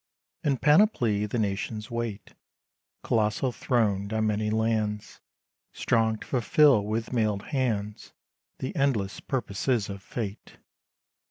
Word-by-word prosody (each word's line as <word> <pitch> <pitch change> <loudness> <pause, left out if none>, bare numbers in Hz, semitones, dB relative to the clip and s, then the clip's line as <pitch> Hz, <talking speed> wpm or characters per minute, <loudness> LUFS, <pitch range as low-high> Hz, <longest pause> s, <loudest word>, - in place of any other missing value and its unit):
In 140 -3 +1
panoply 130 - +3
the 115 - -3
nations 105 +2 -2
wait, 115 -3 -4 0.7
Colossal, 110 +3 +1
throned 105 -5 0
on 110 0 +1
many 105 0 0
lands; 110 -1 -1 0.5
Strong 110 -2 +1
to - - -8
fulfill 135 -2 +4
with 110 +3 -3
mailed 105 -4 0
hands 110 -7 -2 0.5
The 130 +9 -5
endless 120 - 0
purposes 120 -3 -1
of 100 -1 -6
Fate. 105 0 -6
110 Hz, 110 wpm, -27 LUFS, 105-125 Hz, 0.7 s, fulfill